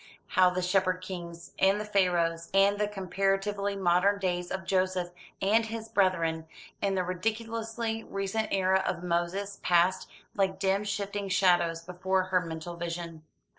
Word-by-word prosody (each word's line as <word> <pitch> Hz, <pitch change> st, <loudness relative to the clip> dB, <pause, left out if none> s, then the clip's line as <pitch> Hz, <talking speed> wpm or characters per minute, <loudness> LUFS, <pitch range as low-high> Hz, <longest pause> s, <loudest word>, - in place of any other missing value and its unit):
How 185 Hz, -1 st, +5 dB
the 180 Hz, 0 st, -2 dB
Shepherd 185 Hz, 0 st, +1 dB
Kings, 170 Hz, -2 st, -7 dB
and 195 Hz, +2 st, +4 dB
the 210 Hz, -, -4 dB
Pharaohs, 175 Hz, -5 st, +1 dB
and 200 Hz, +1 st, +4 dB
the 210 Hz, -, +2 dB
comparatively 195 Hz, +1 st, -1 dB
modern 190 Hz, +2 st, +3 dB
days 180 Hz, -2 st, -2 dB
of 190 Hz, 0 st, -4 dB
Joseph 185 Hz, -2 st, 0 dB, 0.3 s
and 220 Hz, +3 st, +3 dB
his 225 Hz, 0 st, -6 dB
brethren, 170 Hz, -6 st, +1 dB, 0.3 s
and 195 Hz, -1 st, +1 dB
the 185 Hz, -, +1 dB
ridiculously 225 Hz, +4 st, -3 dB
recent 195 Hz, +3 st, -2 dB
era 190 Hz, 0 st, +2 dB
of 175 Hz, -, -2 dB
Moses, 180 Hz, +4 st, -2 dB
passed, 180 Hz, +1 st, +2 dB, 0.2 s
like 195 Hz, -2 st, 0 dB
dim 195 Hz, +1 st, +1 dB
shifting 200 Hz, 0 st, -3 dB
shadows, 175 Hz, -3 st, +3 dB
before 185 Hz, +2 st, 0 dB
her 185 Hz, 0 st, +1 dB
mental 165 Hz, 0 st, -6 dB
vision. 170 Hz, -1 st, -5 dB
190 Hz, 145 wpm, -29 LUFS, 175-200 Hz, 0.3 s, How